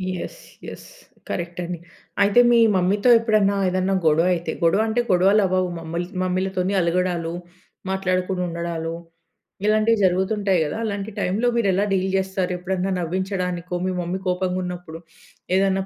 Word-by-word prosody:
Yes. 175 - -7 0.3
Yes. - - -9 0.4
Correct 175 0 -4
అండి. 175 0 -4 0.5
అయితే 205 +4 +4
మీ 240 - +5 0.2
మమ్మీతో 195 +6 +2
ఎప్పుడన్నా, 215 -3 +2
ఏదన్నా, 185 +1 0
గొడవ 160 +2 +4
అయితే, 165 -1 -4
గొడవ 170 +6 +4
అంటే, 225 +2 +1
గొడవలవ్వవు 185 0 +3
మమ్మల్ 165 +2 -4 0.2
మమ్మీలతోని, 185 +1 -1
అలగడాలు, 170 -1 0 0.6
మాట్లాడకుండా 185 -1 -1
ఉండడాలు, 170 -1 -4 0.7
ఇలాంటివి 215 +1 +3
జరుగుతుంటాయి 190 0 +1
గదా! 150 +7 -4
అలాంటి 205 -1 -3
టైమ్‌లో 200 +6 +1
మీరు 230 -4 +2
ఎలా 195 +2 +1
డీల్ 190 0 +1
చేస్తారు? 190 -1 -2
ఎప్పుడైనా 190 +1 -2
నవ్వించడానికో 180 0 -3
మీ 185 - 0
మమ్మీ 180 +2 -3
కోపంగున్నప్పుడు 180 -2 -3 0.6
ఏదన్నా 195 0 +2
185 Hz, 130 wpm, -22 LUFS, 175-195 Hz, 0.7 s, మీ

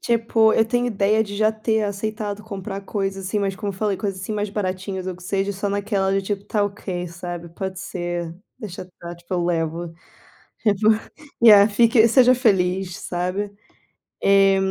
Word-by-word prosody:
Tipo, 225 -1 +3
eu 225 - +4
tenho 245 +2 0
ideia 215 -1 +2
de 205 -1 -7
já 215 +1 +3
ter 220 0 0
aceitado 210 0 -3
comprar 200 -2 -6
coisas 195 -1 -3
assim, 200 +3 -1
mas 195 -2 -1
como 200 0 -3
eu - - -13
falei, 205 -1 0
coisas 195 -1 -3
assim 190 +3 -4
mais 210 -1 -2
baratinhas 190 -1 -3
ou 185 - -4
que 185 - -15
seja, 195 +2 -1
só 200 +1 -3
naquela 200 -1 0
de 195 - +1
tipo: 200 0 -3
"Tá 210 -1 0
ok, 190 -3 -4
sabe, 175 0 -7
pode 190 +1 -5
ser, 175 -3 -4 0.2
deixa 200 -5 -7
estar" 175 -1 -10
Tipo: 170 +2 -6
"Eu 175 -1 0
levo". 165 0 -2 0.7
Tipo, 210 -1 +2 0.6
Yeah, 205 -2 +9
fique 230 +2 +5
seja 255 +1 +6
feliz, 190 -6 +1
sabe. 185 +2 -3 0.7
Eh, 195 0 +5
195 Hz, 175 wpm, -22 LUFS, 185-215 Hz, 0.7 s, Yeah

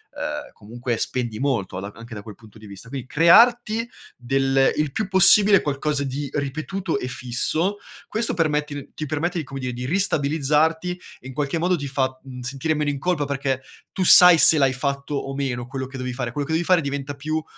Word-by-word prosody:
ehm, 295 0 -5
comunque 120 +3 -5
spendi 120 -2 -3
molto 130 -8 -2
a - - -5
d - - -15
anche 115 +1 -12
da 105 - -7
quel 105 -2 -11
punto 110 -1 -18
di 110 - -13
vista. 100 +3 -12
Quindi 130 -1 -7
crearti 230 - +4 0.3
del 135 +2 +1
il 150 -2 -1
più 215 +8 -3
possibile 195 +1 +6
qualcosa 145 0 -2
di 140 +1 -5
ripetuto 155 +4 -3
e 125 - -5
fisso, 130 +10 -2 0.3
questo 225 -3 +2
permette 150 -3 -2
ti 155 - -6
permette 170 +5 -2
di - - -4
come 135 0 -8
dire, 125 -1 -4
di 125 +1 -6
ristabilizzarti 160 -1 +1 0.3
e 130 - -13
in 130 - -9
qualche 145 +3 -2
modo 180 +3 +1
ti 145 -4 -5
fa, 130 -1 -2
mhmm, 125 -2 -10
sentire 140 +5 -2
meno 150 -1 -1
in 140 - -6
colpa 170 -2 -1
perché 135 -2 -3 0.3
tu 190 - -2
sai 180 -1 +9
se 155 -1 +7
l'hai 135 -1 +3
fatto 140 +2 -3
o 135 -1 -4
meno 130 -3 -3
quello 130 0 -5
che 135 0 -10
dovevi 125 0 -5
fare. 125 -2 -4
Quello 145 +3 -4
che 160 - -4
devi 165 +2 0
fare 180 0 +3
diventa 140 0 -5
più, 155 +2 -3
140 Hz, 210 wpm, -22 LUFS, 130-160 Hz, 0.3 s, sai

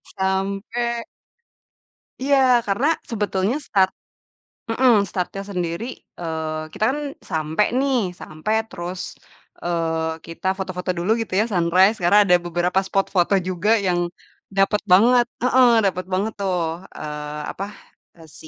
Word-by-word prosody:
sampai 200 +5 -1 1.2
Iya, 280 0 +4 0.3
karena 235 +9 +1 0.2
sebetulnya 205 +1 0
start 190 -2 +3 0.8
mhm, 250 +1 +4 0.2
startnya 190 +1 -3
sendiri 180 +2 -3 0.3
eee, 160 -2 -3
kita - - -3
kan 295 - -3 0.3
sampai 160 +4 +1
nih, 275 -1 +1 0.2
sampai 155 +8 -4 0.2
terus, 180 +1 -5 0.6
eee, 165 -1 -1
kita 165 +3 -6
foto-foto 185 -1 -4
dulu 175 +5 0
gitu 225 - -5
ya, 215 - +3
sunrise. 185 +4 +4
Karena 190 +4 +5
ada 180 -2 +5
beberapa 175 +2 +1
spot 195 0 +1
foto 175 +2 +3
juga 185 +3 -1 0.2
yang 175 -1 +2 0.6
dapet 200 +2 +3
banget 240 +6 +6 0.2
heeh, 255 0 +5 0.2
dapet 185 -1 -1
banget 205 +4 0
tuh, 190 -2 0 0.4
eee, 150 0 -5
apa? 195 - -6 0.5
E 165 - -16 0.2
si - - -12
190 Hz, 125 wpm, -22 LUFS, 170-210 Hz, 1.2 s, banget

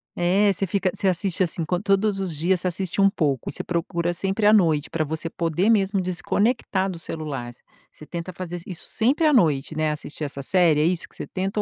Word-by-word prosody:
É, 195 +4 +3
você 195 +1 -1
fica 185 0 0
você 195 - -1
assiste, 185 0 0
assim, 170 -2 +1
co 175 +3 -1
todos 195 0 +1
os 185 -4 -3
dias, 175 +5 +1
você 185 - -2
assiste 180 +1 -3
um 195 0 +6
pouco, 145 -9 -1
e - - -6
você - - -4
procura 170 0 -1
sempre 195 +4 -1
à 210 - +7
noite, 165 -8 +3
pra 160 -1 -1
você 160 +2 -4
poder 170 +5 0
mesmo 200 -3 +2
desconectar 190 +2 0
do 175 -3 -6
celular. 145 -8 -5 0.4
Você 155 - -13
tenta 170 +3 -6
fazer 175 0 -6
i - - -6
isso 175 - -4
sempre 265 +8 +2
à 305 - +5
noite, 155 - +2
né, 155 0 +1
assistir 150 0 -5
essa 140 -1 -5
série, 165 0 +3
é - - +3
isso 175 0 0
que - - -15
você - - -6
tenta? 195 +3 -2
180 Hz, 225 wpm, -23 LUFS, 160-195 Hz, 0.4 s, à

